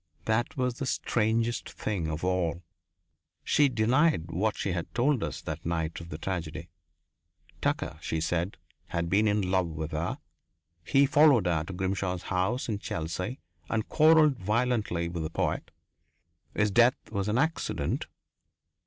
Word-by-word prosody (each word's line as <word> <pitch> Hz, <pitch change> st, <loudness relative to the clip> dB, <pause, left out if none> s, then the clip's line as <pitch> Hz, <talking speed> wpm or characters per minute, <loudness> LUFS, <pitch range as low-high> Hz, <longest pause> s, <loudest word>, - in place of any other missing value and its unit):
That 110 Hz, +4 st, 0 dB
was 125 Hz, -1 st, -1 dB
the 135 Hz, -, -2 dB
strangest 115 Hz, 0 st, 0 dB
thing 95 Hz, -7 st, -3 dB
of 80 Hz, +1 st, -4 dB
all. 90 Hz, -2 st, 0 dB, 0.8 s
She 145 Hz, -1 st, +4 dB
denied 120 Hz, -, +2 dB
what 105 Hz, +6 st, 0 dB
she 100 Hz, -, -1 dB
had 85 Hz, -1 st, -3 dB
told 130 Hz, 0 st, +2 dB
us -, -, -4 dB
that -, -, -5 dB
night 80 Hz, -1 st, -2 dB
of 85 Hz, -, -10 dB
the 75 Hz, -, -5 dB
tragedy. 85 Hz, -3 st, -4 dB, 0.9 s
Tucker, 75 Hz, -, -1 dB
she 80 Hz, -, -2 dB
said, 85 Hz, +4 st, -1 dB, 0.3 s
had 85 Hz, 0 st, -2 dB
been 105 Hz, +3 st, +4 dB
in 105 Hz, -3 st, +1 dB
love 95 Hz, -2 st, +2 dB
with 80 Hz, 0 st, -5 dB
her; 80 Hz, +3 st, -2 dB, 0.7 s
he 135 Hz, +10 st, +4 dB
followed 145 Hz, -6 st, +5 dB
her 80 Hz, -3 st, +1 dB
to 95 Hz, -, -7 dB
Grimshaw's 95 Hz, -1 st, -2 dB
house 95 Hz, +8 st, 0 dB
in 105 Hz, -4 st, -2 dB
Chelsea 90 Hz, +8 st, -4 dB, 0.3 s
and 110 Hz, -1 st, -1 dB
quarrelled 155 Hz, -3 st, +5 dB
violently 105 Hz, -4 st, 0 dB
with 85 Hz, -1 st, -4 dB
the 80 Hz, -, -2 dB
poet. -, -, -2 dB, 0.9 s
His 105 Hz, -1 st, +2 dB
death 120 Hz, +4 st, +5 dB, 0.2 s
was 100 Hz, -2 st, -1 dB
an 105 Hz, +2 st, +1 dB
accident. 160 Hz, +4 st, -1 dB
100 Hz, 150 wpm, -29 LUFS, 85-120 Hz, 0.9 s, followed